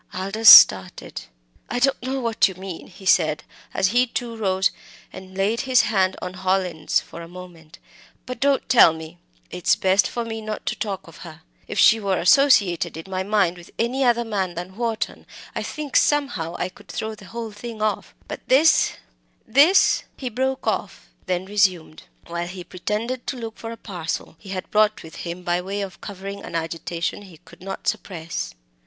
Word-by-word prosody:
Aldous 195 +4 +4
started. 95 -8 +7 0.5
"I 245 - -2
don't 270 +2 +2
know 260 +2 -3
what 230 -3 +2
you 190 - -7
mean," 185 -2 -8
he 190 +1 -15
said, 155 -4 +3 0.3
as 190 - +1
he 245 +4 +3
too 235 -1 -4
rose 190 -3 +1 0.4
and 190 0 -11
laid 210 +4 +1
his 260 -3 +4
hand 190 -3 +1
on 180 - -5
Hallin's 185 -3 0
for 170 - -11
a 165 - -9
moment. 175 -2 -13 0.5
"But 250 0 -6
don't 275 -1 +1
tell 230 -9 +7
me! 160 +2 -10 0.3
It's 180 -1 +2
best 190 +1 +3
for 235 -1 -4
me 225 -1 -5
not 215 -1 -6
to - - -1
talk 200 -5 -4
of 165 - -14
her. 160 -2 -12 0.2
If - - -6
she 225 - +6
were 195 -3 0
associated 185 - +3
in 165 +4 -10
my 185 0 -1
mind 190 -3 +1
with 175 - -13
any 250 +4 0
other 235 -1 +2
man 190 -5 -2
than 180 +2 -7
Wharton, 230 -1 -3 0.3
I - - -3
think 300 -2 -6
somehow 240 - +1
I - - -1
could - - -19
throw 220 0 -4
the 210 -2 -13
whole 230 +2 -6
thing 225 +2 -8
off. 215 -1 -2
But - - -7
this 295 +5 +4 0.5
this 290 - +5
" - - -41
He 255 - -4
broke 260 +3 -2
off; - - -3 0.2
then 180 0 -1
resumed, 190 -6 0 0.2
while 170 0 -4
he 180 0 -8
pretended 215 +8 -4
to 265 - -3
look 225 -2 -7
for 225 - -7
a 230 - -8
parcel 175 -7 -5
he 200 - -13
had 185 -1 -5
brought 215 0 +2
with 160 - -11
him, 175 +1 -6
by 175 0 0
way 200 +2 -4
of 195 -3 -7
covering 200 0 -7
an - - -8
agitation 165 +2 -3
he 185 -5 -14
could 165 +1 -19
not 195 +1 -7
suppress. 170 -4 -4
195 Hz, 190 wpm, -22 LUFS, 175-230 Hz, 0.5 s, started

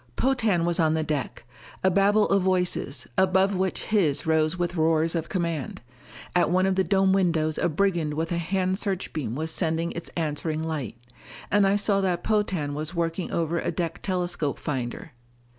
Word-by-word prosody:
Potan 225 -10 +1
was 175 -1 +1
on 160 -1 +3
the 160 - 0
deck 145 -5 -3 0.4
a 190 - +4
babble 200 +3 +4
of 195 0 +3
voices, 180 -8 0
above 190 +1 +3
which 185 0 -1
his 165 -10 +1
rose 160 +1 +2
with 175 0 -1
roars 160 0 +2
of 165 -2 -3
command. 170 -7 -2 0.6
At 175 - +3
one 185 +2 +3
of 190 - +2
the 190 0 +2
dome 190 +2 +3
windows 165 -5 +1
a 175 - +1
brigand 170 -3 0
with 165 +2 -2
a 170 - 0
hand 185 +2 -1
searchbeam 160 - -3
was 160 +3 -2
sending 165 0 0
its 170 - -7
answering 155 0 -2
light. 150 -9 -4 0.5
And 205 -1 +4
I 195 - +3
saw 200 -1 +2
that 180 -2 -1
Potan 195 -9 0
was 155 +4 -4
working 170 +1 -2
over 170 0 0
a - - -2
deck 170 -2 -3
telescope 175 -6 -1
finder. 130 +1 -4
170 Hz, 175 wpm, -26 LUFS, 155-190 Hz, 0.6 s, a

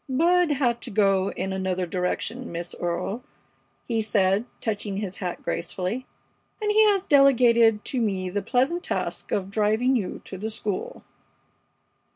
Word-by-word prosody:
"Bud 335 +4 +3
had 245 -4 0
to - - -6
go 195 -2 +2
in 190 - -3
another 185 -1 -1
direction, 185 +8 -3
Miss 170 +1 -5
Earle," 175 +7 -2 0.6
he 230 -2 0
said, 205 0 +2
touching 205 -2 -3
his 200 -2 -4
hat 180 -3 -5
gracefully, 200 +8 -3 0.5
"and 420 -1 0
he 435 +1 +6
has 400 -2 +3
delegated 235 -6 +5
to 255 - -1
me 190 -4 -1
the 200 +3 -2
pleasant 270 - +1
task - - -3
of 195 -1 -1
driving 220 +5 +2
you 200 -7 -2
to 190 - -7
the 220 +2 -3
school." 215 -3 -4
215 Hz, 150 wpm, -25 LUFS, 190-255 Hz, 0.6 s, he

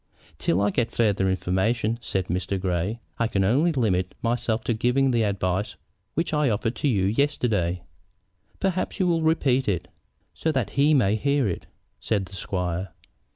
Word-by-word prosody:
"Till 90 +4 +1
I 100 0 +2
get 120 +3 0
farther 100 -4 +2
information," 95 +5 0
said 95 -5 -2
Mr. 90 +2 -2
Grey, 95 +5 -1 0.2
"I 115 - +2
can 100 -3 0
only 140 - +3
limit 95 - 0
myself 115 -1 0
to 120 - 0
giving 125 +4 +2
the 120 -2 +2
advice 100 -1 -1 0.4
which 165 0 -1
I 150 -3 +3
offered 115 +2 -1
to - - 0
you 105 -8 +2
yesterday." 105 - 0 0.8
"Perhaps 190 +1 -1
you 185 - +3
will 170 -2 +2
repeat 135 -5 +2
it, 90 -5 -1 0.4
so 160 - -1
that - - -1
he 145 +2 +4
may 110 -5 +3
hear 140 0 +1
it," 90 - -4 0.3
said 100 -3 0
the 95 - -12
squire. 90 -1 -3
110 Hz, 165 wpm, -25 LUFS, 95-135 Hz, 0.8 s, he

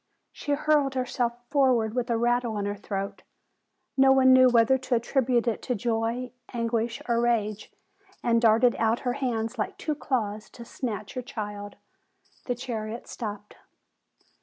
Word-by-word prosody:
She 290 - -3
hurled 285 -2 +2
herself 250 -2 -1 0.2
for 270 -3 +4
ward 220 -2 -1
with 250 0 -2
a 230 - +2
rattle 240 -1 +1
in 200 - -2
her 205 0 -2
throat, 195 -1 -5 0.7
no 270 0 +6
one 260 -1 +6
knew 255 0 +7
whether 240 +2 +4
to 255 -1 0
attribute 240 0 +1
it 230 - 0
to 250 - -2
joy, 230 +3 -1 0.2
anguish, 230 +2 -2
or 235 -1 +2
rage, 215 -3 0 0.5
and 230 -1 +3
darted 230 +1 +5
out 225 +1 +1
her 245 -2 -1
hands 240 -3 -2
like 210 - -2
two 310 - -2
claws 220 -7 -2
to 235 - -10
snatch 215 -4 -5
her 255 - -3
child. 205 -4 -6 0.7
The 245 - 0
chariot 230 -2 -5
stopped. 210 -2 -7
235 Hz, 160 wpm, -27 LUFS, 220-255 Hz, 0.7 s, knew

